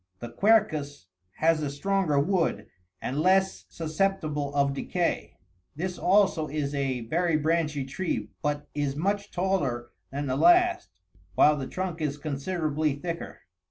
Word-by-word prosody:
The 120 +4 -7
quercus 155 - +2 0.3
has 160 0 +2
a 145 - -1
stronger 165 0 +1
wood, 165 - +1 0.4
and 135 +3 -2
less 190 +3 +2
susceptible 155 -3 -1
of 140 -1 +2
decay: 170 +5 -2 0.4
this 180 +4 -4
also 185 -4 +3
is 145 -1 -3
a 135 -3 -1
very 165 +7 +1
branchy 155 -3 0
tree, 150 +7 -3
but 145 -1 -2
is 145 -2 -1
much 200 +6 -1
taller 140 -11 -1 0.2
than 140 +2 -3
the 130 -1 -1
last, 355 - +4 0.5
while 150 - +6
the 135 -3 -4
trunk 180 -3 -4
is 145 -2 -1
considerably 155 0 -1
thicker. 170 +3 -6
155 Hz, 135 wpm, -27 LUFS, 140-185 Hz, 0.5 s, while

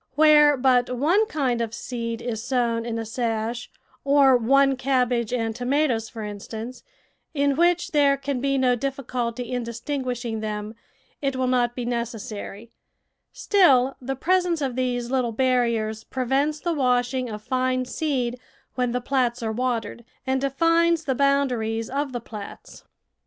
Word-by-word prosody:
Where 295 -1 +6
but 250 -1 +3
one 355 - +3
kind 255 - -1
of 230 0 -3
seed 230 -2 -5
is 225 -2 -3
sown 235 -2 0
in 230 -1 -3
a 225 - -3
sash, 230 +1 -3 0.3
or 275 -2 +5
one 270 +3 +3
cab 255 -1 +1
bage 235 -3 -1
and 225 -3 -1
tomatoes, 250 -2 0
for 225 - -7
instance, 220 +4 -7 0.5
in 280 -1 +2
which 345 +2 +2
there 285 -2 +4
can 275 -2 -3
be 275 0 +1
no 255 -2 +3
difficulty 250 -2 -3
in 250 -1 -1
distinguishing 240 -1 -4
them, 210 0 -4 0.5
it 275 -2 -1
will 260 0 0
not 245 -1 +1
be 245 - -4
necessary; 230 -2 -5 0.6
still 270 -10 +3
the 270 +2 -3
presence 355 +3 +1
of 265 -4 -2
these 245 -1 -2
little 250 -3 0
barriers 235 -3 0
prevents 270 +4 -1
the 345 +1 -1
washing 250 -2 +1
of 210 -1 -7
fine 255 0 0
seed 250 -4 -2 0.3
when 250 -2 -1
the 250 - -1
plats 245 -2 0
are 220 - -1
watered, 235 0 -2 0.2
and 265 0 0
defines 330 +4 +2
the 270 - 0
boundaries 250 -5 0
of 280 0 -2
the 245 - -3
plats. 215 -3 -10
250 Hz, 150 wpm, -24 LUFS, 235-275 Hz, 0.6 s, Where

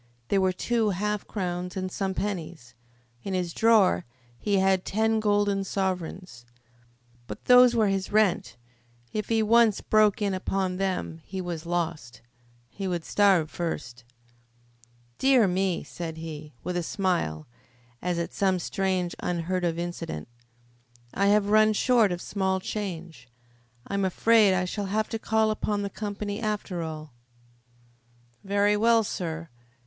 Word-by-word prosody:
There 195 - +3
were 190 0 +3
two 225 +4 0
half 210 +2 -2
crowns 180 -1 -4
and 185 0 -3
some 190 0 -2
pennies. 170 - -4 0.5
In 190 +6 -3
his 175 -2 -2
drawer 215 - +4 0.4
he 205 -2 +1
had 190 -1 +2
ten 220 +2 +1
golden 205 -2 +1
sovereigns. 185 -8 -3 0.8
But - - -8
those 250 -1 +7
were 220 -2 +3
his 195 -1 -2
rent. 205 - +1 0.6
If 215 -1 -3
he 225 -1 +2
once 225 -1 +4
broke 215 -2 +3
in 200 -2 0
upon 185 0 -1
them 185 -4 -2
he 190 - -6
was 170 -2 -5
lost. 165 -9 -3 0.5
He 195 -1 -5
would 175 -3 -3
starve 190 -6 +3
first. 120 -9 -5 1.2
"Dear 260 -5 +5
me!" 185 -1 0
said 165 -2 -7
he, 155 -3 -8
with 180 - -3
a - - 0
smile, 170 - -1 0.6
as 180 -1 -1
at 170 - -3
some 190 -2 +1
strange, 185 -1 -1
unheard 180 +1 -2
of 165 -1 0
incident. 170 - -5 0.9
"I 200 - +2
have 205 0 +4
run 215 0 +5
short 230 -2 +3
of 175 0 -4
small 190 -2 -1
change. 175 - -6 0.6
I - - -7
am 200 0 0
afraid 205 +1 +4
I 185 0 0
shall 200 +2 -3
have 215 +2 -1
to 225 - -3
call 220 0 +1
upon 210 -1 -1
the 200 - -4
company, 205 0 -4
after 210 -5 -3
all." 155 -3 -6 1.3
"Very 205 +1 +2
well, 230 +1 +4
sir." 165 -4 -4
190 Hz, 145 wpm, -26 LUFS, 175-210 Hz, 1.3 s, those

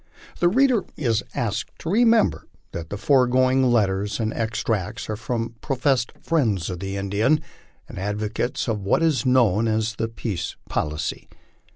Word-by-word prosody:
The 175 - +4
reader 250 -1 +3
is 115 -6 +1
asked 110 -4 -3
to 165 - -6
remember 225 0 +3 0.2
that 80 -1 -6
the 100 - -4
foregoing 130 +1 +3
letters 105 -2 +1
and 110 -1 -1
extracts 110 -3 -2
are - - -1
from 115 +1 -3
professed 130 -3 +1
friends 110 - 0
of 90 - -5
the 95 +1 -4
Indian 105 +10 +2 0.5
and - - -8
advocates 105 +6 -2
of 110 -3 -1
what 100 +11 +2
is 150 -5 +2
known 115 -4 +3
as 110 +1 0
the 115 - -1
peace 110 -4 -4
policy. 75 +2 -3
115 Hz, 150 wpm, -23 LUFS, 100-130 Hz, 0.5 s, The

